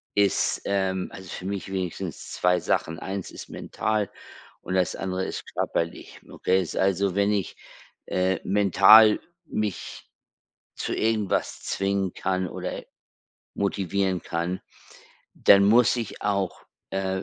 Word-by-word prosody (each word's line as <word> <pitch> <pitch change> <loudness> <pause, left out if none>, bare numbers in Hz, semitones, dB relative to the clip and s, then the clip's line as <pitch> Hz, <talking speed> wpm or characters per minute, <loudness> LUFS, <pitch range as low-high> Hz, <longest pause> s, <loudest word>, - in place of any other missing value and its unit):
ist, 100 -2 +2
ähm, 95 -2 0
also 95 -2 -10
für 90 - -7
mich 100 0 -4
wenigstens 95 -3 -4
2 90 0 +2
Sachen. 80 +1 -1
Eins 95 +1 -5
ist - - -10
mental 110 -2 -2 0.5
und - - -5
das 95 -1 +1
andere 95 0 -2
ist - - -5
körperlich. 85 0 -3
Okay? 95 0 +1
Also 95 0 +2
wenn 100 +1 +2
ich, 100 -2 -1 0.5
äh, 95 +1 +1
mental 105 +2 +7 0.3
mich 105 - -4 0.7
zu - - -3
irgendwas 110 -3 0
zwingen 95 -1 -1
kann 95 -1 -1
oder - - -5 0.7
motivieren 95 -1 0
kann, 85 +2 -3 0.7
dann 100 0 +6
muss 115 +4 +5
ich 115 -4 -5
auch, 100 -3 -1 0.3
äh, 95 -1 -2
95 Hz, 120 wpm, -25 LUFS, 95-100 Hz, 0.7 s, mental